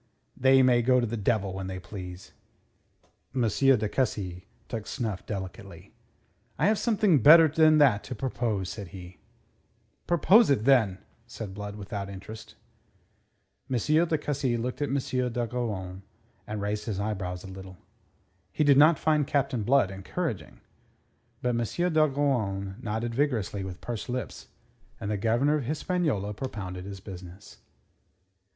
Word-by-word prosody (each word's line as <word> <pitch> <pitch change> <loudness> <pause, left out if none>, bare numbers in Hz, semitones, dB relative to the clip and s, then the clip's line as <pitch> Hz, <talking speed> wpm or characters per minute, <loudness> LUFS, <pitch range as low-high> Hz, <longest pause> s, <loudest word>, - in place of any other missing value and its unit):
"They 130 0 +5
may 125 -2 +4
go 125 +2 +3
to 120 - +1
the 115 +1 -3
devil 100 -2 0
when 95 0 -5
they 95 0 -5
please." 90 0 -9 1.0
M. 125 - +1
de 125 -2 +3
Cussy 95 -7 -2 0.2
took 110 -3 -5
snuff 110 -5 -4
delicately. 95 -3 -7 0.6
"I 150 - +1
have 210 +1 +3
something 210 - +3
better 160 +6 +9
than 155 0 +4
that 130 -9 +4
to 125 - -6
propose," 115 -6 -2
said 105 -3 -7
he. 90 -1 -11 0.9
"Propose 190 +7 +5
it, 125 -6 +2
then," 115 -9 +4 0.3
said 110 -4 -7
Blood, 105 0 -6
without 100 -1 -6
interest. 100 +3 -10 1.1
M. 130 - 0
de 160 +6 +2
Cussy 140 -5 -1
looked 125 +3 -4
at 145 - 0
M. 135 - -1
d'Ogeron, 120 -7 -3 0.5
and 105 -1 -4
raised 105 +1 -2
his 105 -4 -3
eyebrows 95 -4 -3
a - - -9
little. 95 -1 -10 0.7
He - - 0
did 140 -2 +5
not 155 +1 +6
find 150 -2 +1
Captain 140 -5 0
Blood 120 -3 +3
encouraging. 95 -1 -5 0.8
But 125 - +1
M. 120 +10 -1
d'Ogeron 130 -11 +1
nodded 115 0 -3
vigorously 115 -7 -1
with 95 -2 -7
pursed 120 0 -5
lips, 125 -4 -5 0.5
and 100 - -3
the 105 - 0
Governor 120 +9 +2
of 140 - -4
Hispaniola 150 - -1
propounded 95 -6 -6
his 100 -1 -7
business. 95 0 -11
115 Hz, 145 wpm, -27 LUFS, 100-135 Hz, 1.1 s, better